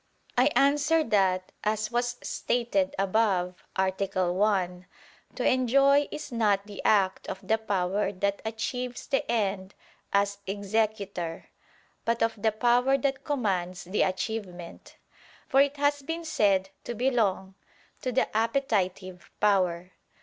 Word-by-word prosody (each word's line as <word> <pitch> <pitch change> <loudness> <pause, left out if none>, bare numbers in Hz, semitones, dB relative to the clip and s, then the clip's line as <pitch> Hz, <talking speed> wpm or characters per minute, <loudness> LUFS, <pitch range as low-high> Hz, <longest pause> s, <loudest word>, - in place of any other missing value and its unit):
I 250 +2 +4
answer 295 +3 +3
that, 190 -6 +1
As 215 +1 -1
was 240 0 -1
stated 215 -6 -1
above 190 -3 0
(A. 190 0 +2 0.4
1) 185 -2 0 0.5
to - - 0
enjoy 275 +3 +4
is 300 -2 -7
not 205 -4 +1
the 205 -1 -8
act 195 -3 +2
of 190 - -7
the 220 0 +2
power 200 -2 0
that 200 +1 -2
achieves 245 +3 -4
the 270 - -1
end 195 -4 -1 0.4
as 200 0 +1
executor, 200 -4 -2 0.5
but 230 0 +1
of 225 -2 -1
the 220 - +3
power 245 +4 +3
that 270 0 -1
commands 195 - -1
the 185 +4 -1
achievement; 185 -3 -4 0.5
for 270 - +5
it 285 +1 +1
has 285 0 +1
been 325 +4 -5
said 195 -9 +2
to 240 - -5
belong 210 -6 0 0.5
to 255 - -2
the 250 -3 0
appetitive 200 - -1
power. 185 -3 +1
210 Hz, 130 wpm, -27 LUFS, 190-245 Hz, 0.5 s, for